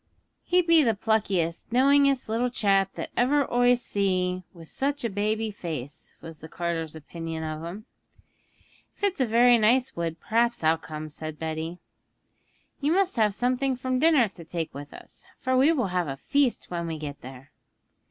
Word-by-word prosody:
'He 360 0 +2
be 335 -1 +5
the 230 -6 +2
pluckiest, 195 -6 0
knowingest 275 +1 +4
little 230 +3 0
chap 195 -5 +2
that - - -6
ever 275 +3 +2
oi 245 0 +5
see 185 -5 0
wi' 170 -2 -13
such 280 - -2
a 230 - -1
baby 215 +2 -1
face!' 155 -9 -7
was 165 -2 -10
the 160 - -11
carter's 165 -2 -3
opinion 165 +1 -6
of 155 0 -5
him. 190 +6 -7 1.1
'If - - -23
it's 385 -8 +1
a 255 - +2
very 240 +1 +5
nice 245 +4 +3
wood 165 -1 -3
perhaps 235 0 0
I'll 160 +1 +3
come,' 155 -1 -7
said 155 0 -7
Betty. 160 +2 -4 1.0
'You 295 +3 +1
must 385 0 +2
save 215 -3 +2
something 255 +2 0
from 255 0 -2
dinner 300 -6 +5
to 175 -3 -12
take 165 0 -4
with 145 +1 -9
us, - - -9
for 260 0 -1
we 270 +5 +5
will 250 - 0
have 180 -2 -1
a 135 -1 -4
feast 275 - 0
when 170 -1 -3
we 160 -1 -4
get 145 -2 -7
there.' 130 +2 -11
205 Hz, 175 wpm, -26 LUFS, 165-255 Hz, 1.1 s, be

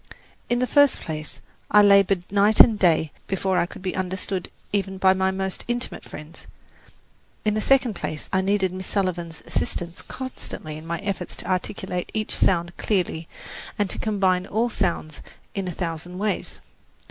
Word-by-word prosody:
In 240 - +2
the 250 - +2
first 285 +1 +4
place, 155 -2 -6 0.3
I 210 0 +7
laboured 200 -2 +5
night 205 +1 +4
and 220 -3 +8
day 160 -4 +3 0.2
before 190 -1 +1
I 175 - +1
could 185 - -11
be 185 - -2
understood 185 0 -2 0.2
even 195 -1 -1
by 190 0 +5
my 190 0 +1
most 190 0 -2
intimate 240 +1 -3
friends; 155 +2 -11 1.0
in 215 - +3
the 215 - 0
second 265 -1 +3
place, 155 -4 -5
I 190 - +3
needed 190 -1 +1
Miss 185 0 -4
Sullivan's 175 -4 -2
assistance 175 0 -2
constantly 255 -11 -6
in 155 +1 -9
my 170 0 -1
efforts 195 -3 -3
to - - -8
articulate 185 0 -2
each 215 -1 0
sound 175 -1 +2
clearly 175 -5 -1 0.5
and 205 -2 0
to - - -3
combine 190 -4 +1
all 230 +3 0
sounds 170 -7 -2 0.3
in 195 -2 -3
a - - -2
thousand 175 +1 -5
ways. 210 +2 -2
190 Hz, 165 wpm, -24 LUFS, 175-205 Hz, 1.0 s, and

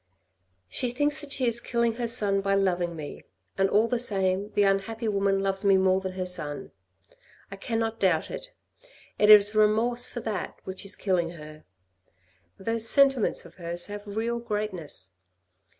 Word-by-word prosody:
" - - -48 0.3
She 245 - -2
thinks 290 +4 -1
that 295 -2 -8
she 265 -2 +2
is 235 0 -1
killing 235 -1 0
her 235 - -1
son 205 -4 +1
by 195 0 0
loving 175 -3 0
me, 150 -2 -8 0.3
and 195 0 +1
all 215 +3 +3
the 245 0 -1
same 195 -3 +1
the 205 - +2
unhappy 200 +4 -1
woman 200 -1 +1
loves 195 0 +3
me 195 -1 +4
more 190 0 +2
than 190 -1 -5
her 185 0 -4
son. 150 -5 -1 0.8
I - - -6
cannot 225 +2 -3
doubt 180 -5 +1
it. - - -8 0.7
It 210 - +4
is 210 0 +8
remorse 225 +3 +3
for 240 - -7
that 210 -5 -5
which 190 +1 -5
is 200 - -6
killing 180 -4 -1
her. 155 -1 -12 0.9
Those 225 +3 +1
sentiments 270 -9 +3
of 170 - -16
hers 170 +1 -1
have 205 0 -8
real 235 +1 -1
greatness. 190 - -5
205 Hz, 170 wpm, -26 LUFS, 185-230 Hz, 0.9 s, is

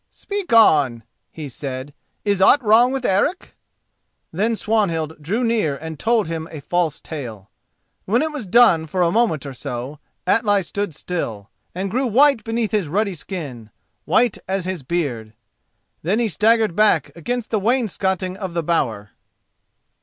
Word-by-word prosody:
"Speak 400 -5 -5
on," 145 - +5 0.3
he 155 -3 -8
said. 135 +1 -6 0.3
"Is 200 -2 +1
aught 270 +8 +6
wrong 230 +4 +5
with 265 -2 -3
Eric?" 200 - 0 0.8
Then 215 +7 +1
Swanhild 170 -9 -1
drew 205 +11 -1
near 220 -11 +1
and 160 0 -8
told 225 -5 +2
him 165 -1 -4
a 155 - -8
false 165 +1 -1
tale. 115 - -8 0.5
When 235 +8 +2
it 315 - -2
was 280 -9 -6
done 180 -7 +5
for 180 +3 0
a 170 - +2
moment 195 - +1
or 140 - -6
so 125 +3 -6 0.3
Atli 205 0 +2
stood 200 -1 -4
still, 115 - -5 0.2
and 190 +1 -3
grew 255 +3 0
white 260 0 +4
beneath 225 -1 -2
his 210 -7 0
ruddy 200 +5 0
skin, 145 - -7 0.4
white 235 -2 +2
as 190 -1 -2
his 185 -3 -3
beard. 125 -8 -3 0.7
Then 190 +7 0
he 235 -1 +1
staggered 220 -1 +2
back 215 +1 +2
against 240 +8 -4
the 220 - +1
wainscoting 190 -5 0
of 190 -4 -6
the 170 - 0
bower. 115 -11 -1
185 Hz, 155 wpm, -21 LUFS, 155-225 Hz, 0.8 s, aught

